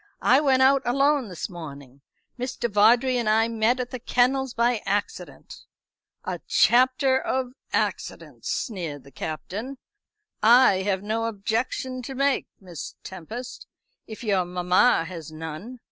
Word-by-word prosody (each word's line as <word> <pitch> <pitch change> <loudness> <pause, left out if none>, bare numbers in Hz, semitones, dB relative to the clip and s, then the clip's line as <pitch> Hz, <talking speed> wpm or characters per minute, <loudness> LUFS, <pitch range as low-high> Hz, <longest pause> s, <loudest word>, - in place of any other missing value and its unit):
"I 260 +3 +5
went 265 -3 +3
out 270 +1 +5
alone 275 +1 +2
this 180 - -5
morning. 140 -7 -10 0.4
Mr. 250 -1 -2
Vawdrey 235 +4 +4
and 235 -3 0
I 220 +1 +3
met 230 +2 +1
at 250 -1 -4
the 255 - -5
kennels 255 +2 +1
by 235 -1 +1
accident." 200 +1 -4 0.6
"A - - -4
chapter 260 +2 +4
of 260 -1 -2 0.2
accidents," - - -3
sneered 170 - -4
the 140 - -16
Captain. 205 - -6 0.6
"I 230 -2 +6
have 190 0 -1
no 225 +2 -1
objection 230 +4 -2
to 265 +2 -7
make, 275 +1 +1
Miss 180 -4 -8
Tempest, 220 +8 -8 0.4
if 220 +3 -9
your 195 -4 +1
mamma 180 +2 +2
has 165 -3 -8
none. 160 +10 -8
230 Hz, 135 wpm, -25 LUFS, 185-255 Hz, 0.6 s, I